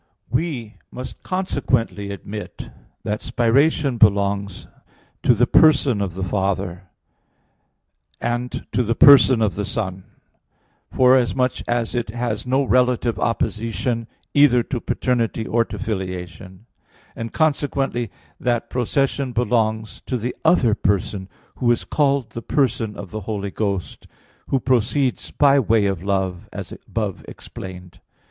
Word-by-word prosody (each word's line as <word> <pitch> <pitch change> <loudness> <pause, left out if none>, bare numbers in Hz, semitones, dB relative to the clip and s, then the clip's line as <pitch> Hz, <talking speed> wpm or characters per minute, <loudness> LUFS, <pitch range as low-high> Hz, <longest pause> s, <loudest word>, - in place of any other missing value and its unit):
We 125 -6 -2
must 125 +1 -8
consequently 130 - -1
admit 100 +1 -7 0.3
that 105 +1 -2
spiration 125 +3 +2
belongs 100 -2 +2 0.6
to 120 - +4
the 120 +3 +4
person 140 -6 +4
of 95 -3 -3
the 95 - -3
Father, 95 -1 -2 1.3
and 120 +1 -3
to 115 - +1
the 115 -1 0
person 135 -4 +7
of 100 -4 +1
the 105 - -3
Son, 95 -3 -4 0.9
forasmuch 130 0 +3
as 120 -1 -1
it 120 -3 -2
has 120 0 -3
no 135 +2 +2
relative 125 -2 +2
opposition 115 +1 -1 0.3
either 135 -4 +5
to 125 -1 -4
paternity 115 -3 -1
or 115 +1 +2
to - - -7
filiation; 95 -2 -5 0.5
and 115 0 -5
consequently 140 -6 0 0.3
that 120 -2 -1
procession 130 +1 0
belongs 110 -2 0
to 130 - -1
the 120 +2 -4
other 155 -9 +4
person 100 -1 -1 0.3
who 120 - +1
is 120 - +1
called 140 -4 +1
the 115 - -6
person 115 -6 0
of 95 - -8
the 110 - -5
Holy 100 -2 -3
Ghost, 100 -4 -3 0.4
who 135 - +1
proceeds 130 +2 0
by 140 -1 +4
way 110 -4 +2
of 95 -4 -1
love, 95 -2 -2
as - - -7
above 105 -5 -4
explained. 90 -2 -10
115 Hz, 125 wpm, -21 LUFS, 100-125 Hz, 1.3 s, person